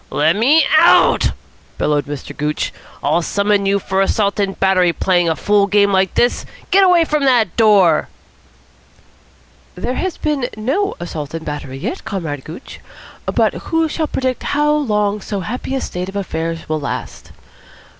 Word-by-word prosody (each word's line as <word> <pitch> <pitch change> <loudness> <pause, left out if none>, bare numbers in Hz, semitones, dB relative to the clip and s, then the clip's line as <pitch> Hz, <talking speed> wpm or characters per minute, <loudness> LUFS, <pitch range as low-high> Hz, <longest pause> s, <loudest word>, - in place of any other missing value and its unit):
"Let 160 +4 +2
me 280 +8 +4
out," 340 - +5 0.5
bellowed 145 -2 0
Mr. 145 -2 -7
Gooch. 150 +1 -2 0.3
"I'll 155 +4 +2
summon 200 +2 0
you 200 0 +2
for 190 0 -1
assault 200 +1 0
and 195 -1 -1
battery. 185 -2 +3
Playing 175 -2 +1
a 160 - 0
fool 205 +2 +2
game 200 0 +3
like 190 -1 +1
this! 240 - +1 0.3
Get 390 +1 +5
away 355 -3 +5
from 300 -2 -1
that 235 -9 +2
door." 200 -8 +4 1.7
"There 250 - -3
has 370 +5 -3
been 285 -5 -1
no 280 - -1
assault 160 -3 -6
and 160 -1 -6
battery 145 -3 -6
yet, - - -5
Comrade 165 -10 -5
Gooch, 165 +11 -10 0.5
but - - +2 0.2
who 325 0 +2
shall 315 0 -2
predict 260 -3 -2 0.2
how 295 0 +3
long 210 -8 0
so 200 0 -4
happy 245 +8 -4
a 265 - -2
state 180 +1 -5
of 200 0 -4
things 165 0 -4
will 155 0 -1
last? 140 - -6
200 Hz, 160 wpm, -17 LUFS, 165-255 Hz, 1.7 s, out